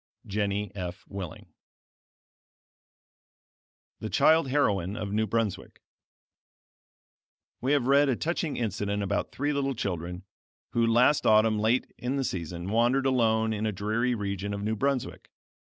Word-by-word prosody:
Jennie 100 0 -2
F. 90 -2 -6
Willing 95 -5 -8 2.5
THE - - -5
CHILD 160 -3 +4
HEROINE 100 -9 +1
OF 100 0 -4
NEW 110 +1 +1
BRUNSWICK 110 -2 -2 1.8
We 135 +3 +1
have 140 -4 +2
read 140 +2 +4
a 130 - +2
touching 165 +2 -2
incident 105 -2 -2
about 100 +1 -2
three 145 +2 -1
little 135 -1 -1
children, 90 -3 -4 0.5
who, 115 -1 +2
last 125 +6 +4
autumn 110 0 +4
late 115 +4 +1
in 125 +3 -2
the 135 - 0
season, 85 -3 -4
wandered 120 +4 +2
alone 110 -4 +2
in 110 +1 -1
a - - 0
dreary 110 +5 0
region 100 -1 -3
of 100 - -5
New 110 +1 0
Brunswick. 135 +2 -2
110 Hz, 135 wpm, -28 LUFS, 100-130 Hz, 2.5 s, CHILD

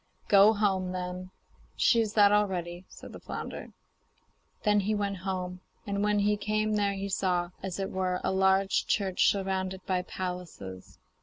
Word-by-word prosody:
'Go 205 +2 +7
home, 190 -3 0
then; 180 0 -5 0.5
she 230 - +4
is 215 -2 -2
that 205 -2 +6
already,' 185 -4 0
said - - -12
the - - -9
flounder. - - -7 0.9
Then 210 -1 +4
he 210 +2 0
went 200 -1 -2
home, 185 -1 -4 0.3
and 200 0 -1
when 210 0 +2
he 205 +1 +2
came 215 +1 0
there 205 -1 +1
he 195 0 -4
saw, 180 -2 0
as 190 -2 -4
it 195 -1 -3
were, 185 -1 -1
a - - 0
large 190 0 +2
church 195 -3 +2
surrounded 190 -1 -2
by 185 -1 0
palaces. 180 - -7
190 Hz, 160 wpm, -29 LUFS, 185-205 Hz, 0.9 s, Go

